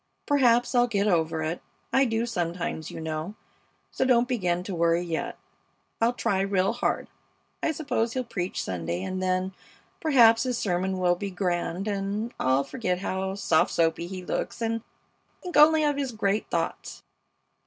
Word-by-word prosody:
Perhaps 245 Hz, -4 st, +3 dB
I'll 245 Hz, -1 st, +4 dB
get 205 Hz, -3 st, 0 dB
over 160 Hz, -4 st, +1 dB
it. 160 Hz, +3 st, -3 dB, 0.3 s
I 265 Hz, +1 st, +5 dB
do 225 Hz, -1 st, 0 dB
sometimes, 175 Hz, -6 st, -3 dB
you -, -, -7 dB
know, 160 Hz, +4 st, -4 dB, 0.6 s
so -, -, 0 dB
don't 245 Hz, -2 st, +4 dB
begin 180 Hz, -8 st, 0 dB
to 190 Hz, -, -5 dB
worry 170 Hz, 0 st, +2 dB
yet. 165 Hz, -2 st, -3 dB, 0.6 s
I'll 235 Hz, +2 st, +3 dB
try 215 Hz, -5 st, 0 dB
real 195 Hz, +1 st, +1 dB
hard. 245 Hz, -, -1 dB, 0.5 s
I -, -, +1 dB
suppose 275 Hz, -7 st, -1 dB
he'll 255 Hz, -, -1 dB
preach 190 Hz, -6 st, -3 dB
Sunday, 85 Hz, 0 st, -3 dB
and 185 Hz, -, -3 dB
then, 185 Hz, 0 st, 0 dB, 0.5 s
perhaps, 240 Hz, -, +5 dB
his 250 Hz, -1 st, -1 dB
sermon 190 Hz, -1 st, -1 dB
will 180 Hz, -1 st, +3 dB
be 200 Hz, +3 st, -4 dB
grand 180 Hz, 0 st, -2 dB
and 205 Hz, +3 st, -2 dB
I'll 130 Hz, +2 st, +2 dB
forget 180 Hz, -, -2 dB
how 190 Hz, +1 st, -3 dB
soft 165 Hz, -5 st, +2 dB
soapy 165 Hz, +1 st, +1 dB
he 185 Hz, 0 st, -7 dB
looks -, -, -3 dB
and 230 Hz, 0 st, -1 dB, 0.6 s
think 360 Hz, -1 st, -6 dB
only 310 Hz, +1 st, +7 dB
of 295 Hz, -1 st, +1 dB
his 275 Hz, -3 st, -2 dB
great 210 Hz, -1 st, 0 dB
thoughts. -, -, -3 dB
195 Hz, 165 wpm, -26 LUFS, 175-235 Hz, 0.6 s, only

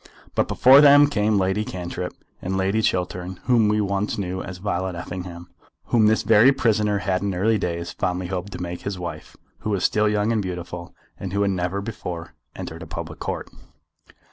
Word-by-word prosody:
But -, -, +1 dB
before 135 Hz, +3 st, +7 dB
them 145 Hz, 0 st, +8 dB
came 105 Hz, -6 st, +1 dB
Lady 95 Hz, +2 st, +1 dB
Cantrip, 90 Hz, -2 st, -5 dB, 0.3 s
and 95 Hz, +1 st, -2 dB
Lady 95 Hz, +3 st, +1 dB
Chiltern, 90 Hz, -2 st, -2 dB
whom 120 Hz, -4 st, +3 dB
we 105 Hz, +1 st, +2 dB
once 100 Hz, +2 st, -1 dB
knew 95 Hz, -2 st, -3 dB
as 95 Hz, -2 st, -7 dB
Violet 95 Hz, -1 st, -2 dB
Effingham, 90 Hz, 0 st, -7 dB, 0.4 s
whom 110 Hz, -3 st, +4 dB
this 110 Hz, +1 st, +2 dB
very 115 Hz, +4 st, +6 dB
prisoner 105 Hz, -5 st, +1 dB
had 95 Hz, -2 st, -1 dB
in 100 Hz, -2 st, -1 dB
early 105 Hz, +4 st, +2 dB
days 85 Hz, -2 st, -3 dB
fondly 90 Hz, +1 st, -2 dB
hoped 95 Hz, +2 st, -4 dB
to -, -, -6 dB
make 85 Hz, 0 st, -5 dB
his 100 Hz, -2 st, -4 dB
wife, 85 Hz, -1 st, -7 dB, 0.2 s
who -, -, -4 dB
was 100 Hz, -3 st, 0 dB
still 105 Hz, 0 st, +3 dB
young 105 Hz, +1 st, +1 dB
and 110 Hz, -2 st, +1 dB
beautiful, 90 Hz, -2 st, -6 dB, 0.2 s
and 95 Hz, -1 st, -5 dB
who 100 Hz, 0 st, +2 dB
had 100 Hz, -, +1 dB
never 90 Hz, +1 st, -2 dB
before 90 Hz, -6 st, -6 dB, 0.2 s
entered -, -, -7 dB
a -, -, -8 dB
public -, -, -7 dB
Court. -, -, -4 dB
95 Hz, 190 wpm, -23 LUFS, 90-105 Hz, 0.4 s, them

